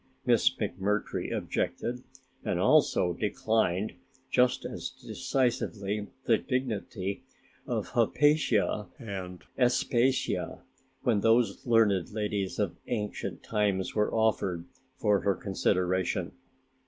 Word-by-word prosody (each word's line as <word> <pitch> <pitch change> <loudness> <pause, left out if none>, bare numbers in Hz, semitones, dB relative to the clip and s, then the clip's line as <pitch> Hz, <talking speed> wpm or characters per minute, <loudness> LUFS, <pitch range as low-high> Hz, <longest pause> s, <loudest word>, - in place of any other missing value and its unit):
Miss - - +5
McMurtry 105 +3 -2
objected 125 +1 -2 0.4
and - - -1
also 90 -1 +4
declined 105 0 0 0.4
just 125 0 +3
as - - -4
decisively 105 -5 -2 0.2
the 115 -2 +4
dignity 110 -6 -2 0.5
of - - -2
"Hypatia" 135 -9 +2
and 95 -5 -6 0.2
"Aspasia', 125 0 +1 0.4
when 115 -4 +3
those 115 -2 +3
learned 110 -6 +3
ladies 105 -2 -2
of 95 -5 -1
ancient 105 -4 -3
times 100 -4 0
were 105 -1 +1
offered 100 -6 +1 0.3
for 105 -2 +3
her 100 -1 +1
consideration. 95 -2 0
105 Hz, 95 wpm, -29 LUFS, 95-115 Hz, 0.5 s, Miss